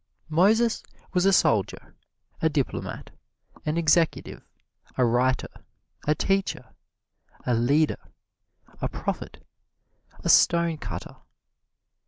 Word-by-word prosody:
Moses 215 Hz, +8 st, +3 dB, 0.3 s
was 180 Hz, +1 st, +3 dB
a -, -, +5 dB
soldier, 105 Hz, -, +1 dB, 0.5 s
a 160 Hz, -, +3 dB
diplomat, 145 Hz, -4 st, -3 dB, 0.6 s
an 155 Hz, +2 st, 0 dB
executive, 165 Hz, 0 st, +1 dB, 0.6 s
a 125 Hz, -, +4 dB
writer, 125 Hz, +2 st, 0 dB, 0.4 s
a 150 Hz, -, +3 dB
teacher, 195 Hz, +3 st, -1 dB, 0.7 s
a 125 Hz, -, +1 dB
leader, 140 Hz, +7 st, +1 dB, 0.7 s
a -, -, -1 dB
prophet, -, -, -5 dB, 0.8 s
a -, -, -2 dB
stonecutter. 170 Hz, -2 st, +2 dB
160 Hz, 90 wpm, -25 LUFS, 130-180 Hz, 0.8 s, a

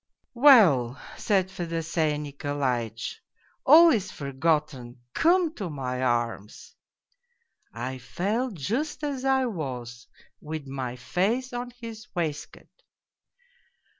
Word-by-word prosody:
' -, -, -48 dB
Well,' 145 Hz, -, +6 dB, 0.2 s
said 190 Hz, -3 st, 0 dB
Fedosey 165 Hz, -3 st, -1 dB
Nikolaitch, 135 Hz, -6 st, -3 dB, 0.2 s
' -, -, -37 dB
all 330 Hz, +2 st, +9 dB
is 200 Hz, -6 st, 0 dB
forgotten, 140 Hz, -3 st, -2 dB
come 340 Hz, -1 st, +3 dB
to 195 Hz, -, -5 dB
my 130 Hz, -4 st, -4 dB
arms! 120 Hz, -4 st, -2 dB, 0.4 s
' 485 Hz, -1 st, -46 dB
" -, -, -51 dB, 0.2 s
I 130 Hz, +3 st, -5 dB
fell 215 Hz, -, -2 dB
just 235 Hz, -, -3 dB
as 280 Hz, -3 st, -3 dB
I 265 Hz, -1 st, +3 dB
was, 125 Hz, -, -5 dB, 0.3 s
with 155 Hz, -1 st, -6 dB
my 130 Hz, -2 st, -5 dB
face 220 Hz, -, -1 dB
on 245 Hz, 0 st, -4 dB
his 225 Hz, -2 st, -9 dB
waistcoat. 155 Hz, -4 st, -5 dB
160 Hz, 115 wpm, -26 LUFS, -, 0.4 s, all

